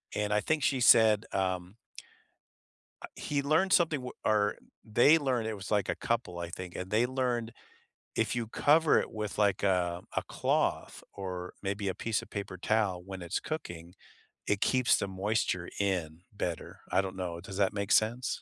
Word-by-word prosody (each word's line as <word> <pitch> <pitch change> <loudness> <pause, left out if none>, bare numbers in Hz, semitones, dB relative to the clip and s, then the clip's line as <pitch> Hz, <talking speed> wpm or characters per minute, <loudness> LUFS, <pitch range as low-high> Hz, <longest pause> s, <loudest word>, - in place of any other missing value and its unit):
and 105 0 0
I 105 - +3
think 155 0 0
she 135 -2 +2
said, 110 -2 +6
um 95 0 -2 1.3
uh, - - -5
he 140 -1 -2
learned 160 +7 +2
something 160 -5 +3
w 125 - -7
or 105 -1 +2 0.3
they 120 +9 +5
learned 125 -6 0
it 110 - -2
was, 100 -1 -8
like, 105 -3 +1
a - - +1
couple, 115 -7 -2
I 85 -1 -4
think, 90 0 -8
and 90 +1 -6
they 115 +3 +3
learned 125 -3 -1 0.6
if 110 +2 +1
you 115 -2 -1
cover 155 +5 +4
it - - -5
with, 105 -1 -4
like, 100 -2 +2
a 90 -3 +1
a - - +1
cloth - - -1
or 90 -2 -6
maybe 100 0 -2
a 95 - -1
piece 115 -2 -1
of - - -13
paper 100 -2 -5
towel 100 -3 0
when 95 -2 -7
it's 85 +3 -2
cooking, 85 - -6 0.5
it 105 0 +1
keeps 130 -1 +3
the 100 - -2
moisture 95 -2 -1
in 90 -5 -1
better. 90 -5 -4
I - - +4
don't 95 -1 -6
know, 85 -2 -4
does 95 +1 -8
that 100 +1 +2
make 100 0 -3
sense? 120 +4 +3
105 Hz, 180 wpm, -30 LUFS, 95-120 Hz, 1.3 s, said